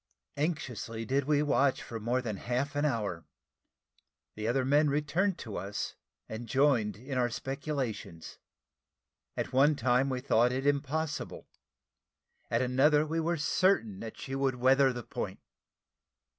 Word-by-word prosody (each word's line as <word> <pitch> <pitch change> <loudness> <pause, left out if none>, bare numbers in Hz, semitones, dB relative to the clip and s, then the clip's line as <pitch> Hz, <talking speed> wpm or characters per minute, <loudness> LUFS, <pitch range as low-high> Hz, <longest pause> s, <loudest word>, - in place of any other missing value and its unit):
Anxiously 125 -7 -3
did 135 +4 +1
we 150 0 +3
watch 140 -2 +2
for 115 - -6
more 120 +4 0
than 110 -5 -3
half 125 +7 -2
an 145 +1 +1
hour; 105 - -1 1.1
the 110 +1 -4
other 130 +2 +1
men 145 +2 +4
returned 150 +7 +1
to 110 - -6
us, 100 +1 -4 0.3
and 115 +2 -6
joined 130 -7 +2
in 130 +3 -4
our 120 -1 +2
speculations. 135 - -4 1.0
At - - -3
one 145 +4 +5
time 130 +1 +2
we 130 -1 -1
thought 125 -2 +3
it 130 +2 -2
impossible 145 +2 -1 1.0
at 115 +2 +1
another 145 +4 +4
we 160 +2 -1
were 170 +1 0
certain 150 - +2
that 115 - -7
she 135 - -6
would 135 -1 +1
weather 130 +2 +4
the 120 -1 -6
point. - - -5
130 Hz, 145 wpm, -30 LUFS, 115-145 Hz, 1.1 s, one